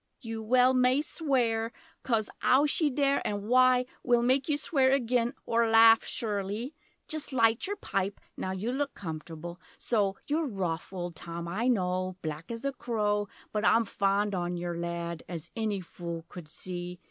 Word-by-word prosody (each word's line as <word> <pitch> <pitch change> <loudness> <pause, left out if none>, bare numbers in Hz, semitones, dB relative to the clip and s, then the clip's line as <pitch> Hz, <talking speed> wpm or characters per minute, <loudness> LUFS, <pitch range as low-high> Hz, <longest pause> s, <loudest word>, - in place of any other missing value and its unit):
You 225 -3 -5
well 250 +3 +4
may 255 +3 +3
swear; 240 -8 0 0.3
Coz 225 -4 +1
'ow 265 +3 +5
she 300 +1 +2
dare 280 0 +2
an' 205 -1 -2
why 255 +1 +5 0.2
Will 240 -1 +3
make 260 +4 +2
you 295 - +2
swear 270 -4 +2
agen, 245 -1 +1
or 230 0 +2
laugh 225 0 +7
surelie! 210 +4 -3 0.3
Just 310 -2 -1
light 230 0 +3
yer 405 - -2
pipe 195 - -2 0.2
Now - - -4
you 190 +5 -2
look 280 +2 -2
comfortable 165 0 -7 0.2
so 205 -4 +1
You're 310 +1 0
rough 180 -8 -3
old 175 -2 -5
Tom 170 +1 -6
I 210 +8 -1
know 185 -5 0
Black 155 +1 -5
as 230 +3 -5
a 275 - +1
crow! 210 -5 -1 0.2
But 210 0 -1
I'm 230 +1 +4
fond 200 0 +1
on 175 -1 -2
yer 175 0 -3
lad 170 -1 -4
As 175 -1 -6
any 215 -4 -1
fool 170 -1 -7
could 175 -3 -9
see! 175 +2 -6
220 Hz, 170 wpm, -29 LUFS, 180-255 Hz, 0.3 s, laugh